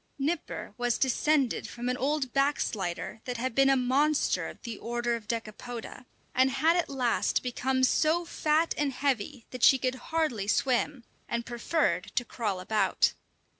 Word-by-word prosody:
Nipper 300 +4 -3
was 245 -1 +1
descended 270 0 +1
from 240 +1 -5
an 250 - +1
old 275 0 -1
"backslider" 220 -9 -1
that 250 -1 -3
had 255 +1 -2
been 270 +2 +4
a 270 - +4
monster 275 +4 +2
of - - -10
the 235 -2 -6
order 240 0 -1
of 220 -2 -8
Decapoda, 230 +2 -6 0.3
and 260 +1 +4
had 310 +6 +3
at 345 -2 0
last 250 -4 +1
become 260 +1 0
so 315 +6 +3
fat 315 0 +1
and 285 -2 0
heavy 260 -1 -1
that 255 - -7
she 265 - +7
could 255 -1 -1 0.2
hardly 305 -12 0
swim, 255 +4 +1 0.3
and 235 0 -2
preferred 235 - 0
to 245 - +1
crawl 210 -6 -3
about. 210 +4 +2
255 Hz, 160 wpm, -29 LUFS, 235-285 Hz, 0.3 s, she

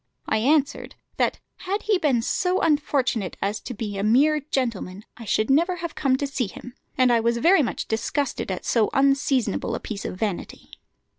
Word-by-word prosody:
I 220 - +1
answered, 285 +5 +1 0.2
that - - +1 0.2
had 390 +2 -3
he 415 -3 +2
been 260 -8 +1
so 365 +8 0
unfortunate 270 - 0
as 205 +2 -2
to 250 - -7
be 205 -2 -4
a - - -1
mere 280 +8 +4
gentleman 230 -9 -3
I 230 - -10
should 215 +4 +1
never 340 +6 +3
have 340 -2 -5
come 270 -3 +1
to 285 - -2
see 270 -4 -2
him; 245 +5 -11 0.2
and 255 -1 +4
I 235 - +4
was 235 +1 +1
very 335 +7 +5
much 250 - -3
disgusted 245 +4 -2
at 185 - -4
so 225 -3 +2
unseasonable 270 -5 +1
a - - -4
piece 205 -3 -6
of - - -5
vanity." 205 -3 -4
255 Hz, 190 wpm, -24 LUFS, 220-295 Hz, 0.2 s, very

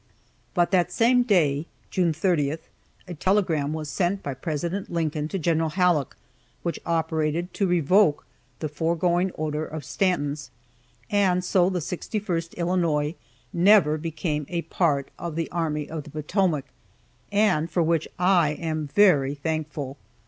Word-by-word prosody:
But 175 0 +2
that 180 -2 +2
same 240 +6 +4
day 165 - +2 0.2
(June 180 -3 +2
30) 155 -3 +1 0.5
a 180 - -6
telegram 165 -5 +1
was 155 -1 -4
sent 180 +6 -1
by 140 - -3
President 165 +8 -3
Lincoln 155 -3 -1
to 195 - -3
Gen. 165 -2 +1
Halleck, 165 -2 +1 0.5
which 170 - -2
operated 160 +1 -1
to 200 - 0
revoke 175 -1 +3 0.4
the 155 - -1
foregoing 170 +4 +1
order 155 0 -2
of 155 -1 -6
Stanton's 145 -7 -1 0.6
and 185 -3 +2
so 180 0 +3
the 185 - -2
61st 175 0 -3
Illinois 170 -4 +1 0.4
never 175 -4 +5
became 155 -2 -3
a 170 -1 -2
part 145 -6 0
of 170 -3 -5
the 165 -1 -3
Army 155 -3 -2
of 160 -1 -5
the 150 - -12
Potomac, 155 0 0 0.7
and 200 -6 +2
for 175 - +1
which 165 -1 +1
I 180 -4 +3
am 155 -1 -3
very 145 -6 +4
thankful. 150 -2 -4
165 Hz, 140 wpm, -25 LUFS, 150-180 Hz, 0.7 s, never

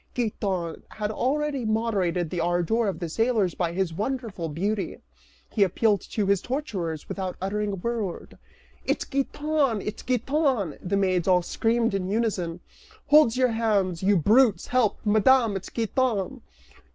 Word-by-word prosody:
Giton 195 -8 -2
had 210 -1 -3
already 280 +3 -1
moderated 200 -7 0
the 175 - -2
ardor 175 +7 +1
of 195 - -2
the 175 - -4
sailors 220 0 +1
by 170 -2 -1
his 180 -1 -1
wonderful 215 -4 -3
beauty, 195 +7 -2 0.5
he 215 - -1
appealed 200 +1 +3
to 210 - -1
his 200 -1 +2
torturers 195 - -4
without 185 -2 -4
uttering 205 +2 -2
a - - -1
word. 210 -1 -4 0.5
"It's - - -1
Giton! 280 -3 0
It's 210 +2 -5
Giton!" 255 - 0
the 195 +2 -1
maids 185 -3 +1
all 180 -1 +4
screamed 230 +3 0
in 190 -1 -2
unison. 195 -6 -1 0.5
"Hold 290 -5 +6
your 255 0 +3
hands, 205 -6 0
you 195 +1 +3
brutes; 220 - +4
help, 250 -4 +1
Madame, 220 +1 +4
it's 195 - -5
Giton!" 235 0 -1
210 Hz, 145 wpm, -26 LUFS, 185-235 Hz, 0.5 s, Hold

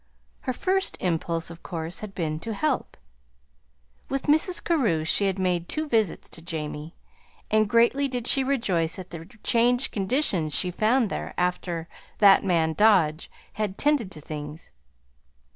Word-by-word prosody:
Her - - +3
first 380 +8 0
impulse, 165 -1 -1
of 170 - -12
course, 165 0 -5
had 205 -3 -8
been 155 -3 -2
"to 220 +5 -5
help." 300 +2 -1 1.1
With 275 0 -2
Mrs. 315 +5 +2
Carew 230 - +1
she 195 +4 +3
made 180 -2 -1
two 310 0 -1
visits 220 - 0
to - - -7
Jamie, 155 -1 -6 0.6
and 215 -1 +3
greatly 235 +5 +3
did 250 -3 -4
she 270 +1 +4
rejoice 195 -12 0
at 185 -1 -9
the 165 -1 -8 0.2
changed 245 +2 +2
conditions 195 - 0
she 180 - +1
found 220 +4 +2
there - - -5
after 175 -2 -2 0.3
"that 200 -2 +6
man 165 -4 +1
Dodge" 180 -6 +3 0.2
had 205 -2 -3
"tended 290 -9 +2
to 155 - -10
things." 150 +1 -8
195 Hz, 145 wpm, -25 LUFS, 165-245 Hz, 1.1 s, that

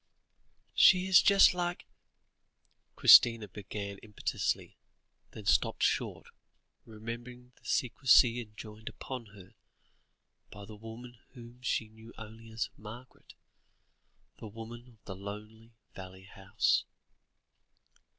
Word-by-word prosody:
"She 185 -1 +5
is 190 -1 +6
just 200 -2 +6
like 175 0 -3 0.5
" - - -45
Christina 115 -3 +7
began 100 +1 -7
impetuously, 105 -2 -4 0.5
then - - -12
stopped - - +1
short, - - -1 0.6
remembering 120 +3 -9
the - - -27
secrecy 125 -1 +3
enjoined 110 0 -10
upon 125 -4 -8
her, 95 -1 -15 1.0
by 100 0 -11
the 105 +1 -11
woman 115 +3 -11
whom 120 -1 -14
she 115 -2 -1
knew 110 +1 -15
only 110 +1 -12
as 110 -2 -3
"Margaret," 115 +5 -13 1.0
the - - -8
woman 115 +3 -10
of 115 -4 -23
the 95 - -7
lonely 105 +3 -10 0.2
valley 95 0 -11
house. 95 -1 0
110 Hz, 110 wpm, -31 LUFS, 105-120 Hz, 1.0 s, Christina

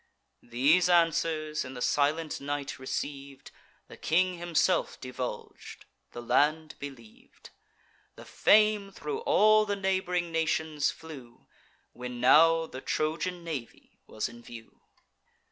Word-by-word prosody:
These 145 +10 +3
answers, 160 -3 +1
in 130 0 -9
the 125 - -7
silent 150 +2 0
night 140 -1 -4
receiv'd, 140 +1 -6 0.4
The - - -13
king 180 +2 +1
himself 175 +1 0
divulg'd, 125 -4 -7 0.3
the 120 - -8
land 155 +6 +1
believ'd: 125 -6 -12 0.6
The - - -12
fame 210 -2 +3
thro' 430 - -5
all 215 - +4
the 205 - -1
neighb'ring 185 -3 -1
nations 160 -2 0
flew, 135 -7 -11 0.5
When 125 0 -7
now 165 +6 +5
the 130 -4 -9
Trojan 170 +5 -2
navy 150 -8 -8
was 110 - -3
in 120 0 -13
view. 115 -1 -13
155 Hz, 115 wpm, -28 LUFS, 130-175 Hz, 0.6 s, now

